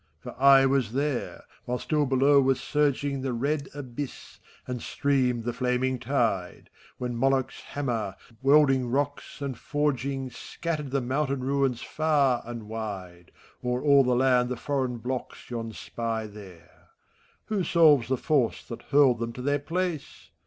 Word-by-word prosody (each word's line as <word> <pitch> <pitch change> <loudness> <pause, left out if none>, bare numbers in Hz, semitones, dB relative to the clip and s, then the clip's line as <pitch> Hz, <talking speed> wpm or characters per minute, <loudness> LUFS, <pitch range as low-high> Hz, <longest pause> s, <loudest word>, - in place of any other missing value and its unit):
For - - -9
I 135 -1 +7
was 135 -5 +1
there, 140 -1 -2 0.2
while 125 0 -1
still 150 +2 0
below 135 +2 +5
was 135 -1 +2
surging 140 0 0
The 130 -1 -2
red 140 +4 -1
abyss, 140 -1 -7 0.3
and 125 -2 -4
streamed 130 -4 0
the 120 +1 -2
flaming 125 +1 0
tide,— 115 -9 -1 0.3
When 125 -1 -3
Moloch's 135 +1 0
hammer, 115 -9 -3 0.3
welding 135 -2 +4
rocks 145 +2 -2
and 135 -2 -3
forgiiigy 135 -1 -2
Scattered 155 -1 -4
the 135 +1 0
mountain 135 +2 -1
ruins 135 -2 0
far 145 -6 +1
and 120 -1 -6
wide. 100 -6 -7 0.3
O'er 125 0 -1
all 140 -2 +6
the 125 -1 +2
land 125 -1 +3
the 125 - -3
foreign 130 -2 -2
blocks 125 +1 -6
yon 115 -1 -4
spy 115 0 -4
there; 95 -6 -14 0.6
Who 205 -4 -1
solves 155 -8 +5
the 130 +1 0
force 130 -4 +1
that 115 - -6
hurled 140 -5 +5
them 115 0 -3
to 125 - -7
their 145 +1 +1
place? 170 +1 -4
130 Hz, 150 wpm, -27 LUFS, 120-140 Hz, 0.6 s, I